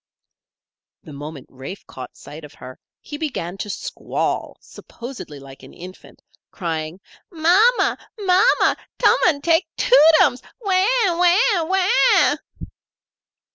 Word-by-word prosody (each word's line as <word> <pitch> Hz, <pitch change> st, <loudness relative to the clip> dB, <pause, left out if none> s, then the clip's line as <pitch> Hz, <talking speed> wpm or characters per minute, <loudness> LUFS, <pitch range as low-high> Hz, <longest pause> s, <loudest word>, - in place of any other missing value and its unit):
The 150 Hz, -, -12 dB
moment 145 Hz, -1 st, -9 dB
Rafe 135 Hz, +9 st, -10 dB
caught 130 Hz, -, -11 dB
sight 155 Hz, +2 st, -12 dB
of 150 Hz, -, -13 dB
her 130 Hz, 0 st, -12 dB, 0.2 s
he 295 Hz, -, -9 dB
began 220 Hz, -, -4 dB
to 210 Hz, -, -5 dB
squall, 190 Hz, -, -4 dB
supposedly 235 Hz, -, -11 dB
like 135 Hz, 0 st, -14 dB
an -, -, -15 dB
infant, 185 Hz, +2 st, -13 dB, 0.3 s
crying: 165 Hz, -2 st, -5 dB, 0.3 s
"Ma 340 Hz, +3 st, +3 dB, 0.2 s
ma! -, -, +1 dB, 0.2 s
Ma 375 Hz, -2 st, +3 dB, 0.2 s
ma! -, -, +3 dB, 0.2 s
Tum -, -, +4 dB
an' 290 Hz, -5 st, +1 dB
take 330 Hz, +3 st, +2 dB
Too -, -, +4 dB, 0.2 s
tums. 250 Hz, -, +2 dB, 0.2 s
Waw! 385 Hz, -4 st, +1 dB, 0.2 s
Waw! 355 Hz, +1 st, +2 dB
Waw!" 380 Hz, +2 st, +3 dB
275 Hz, 125 wpm, -20 LUFS, -, 0.3 s, Tum